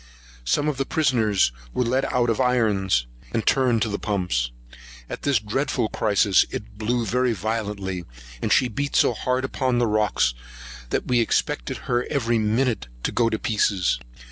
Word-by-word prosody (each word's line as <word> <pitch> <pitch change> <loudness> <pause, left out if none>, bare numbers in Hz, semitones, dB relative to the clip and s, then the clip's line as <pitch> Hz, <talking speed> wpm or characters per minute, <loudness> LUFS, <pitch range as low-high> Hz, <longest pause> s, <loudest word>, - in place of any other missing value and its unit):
Some 60 - +1
of 150 -3 -1
the 135 - -1
prisoners 110 - +2 0.2
were - - +2
let 130 +3 0
out 120 -1 +2
of 115 - 0
irons, 105 - +2 0.3
and 110 - -1
turned 125 -5 +3
to - - -1
the 100 - -3
pumps. 90 - -1 0.6
At - - -6
this 140 -2 +2
dreadful 120 +1 -1
crisis, 100 -2 +3
it 105 0 -8
blew 120 +2 0
very 125 +3 +1
violently; 100 -3 -3 0.4
and - - -1
she 130 - +4
beat 140 +5 -3
so - - +4
hard 125 +3 -1
upon 130 -1 0
the 120 - +3
rocks, 105 - +1 0.6
that - - -1
we 125 -1 +3
expected 85 - -1
her, 120 0 0
every 120 -5 +1
minute, 110 - 0 0.2
to - - 0
go 115 -1 +2
to 110 - -1
pieces. 100 - +1
115 Hz, 170 wpm, -24 LUFS, 105-125 Hz, 0.6 s, she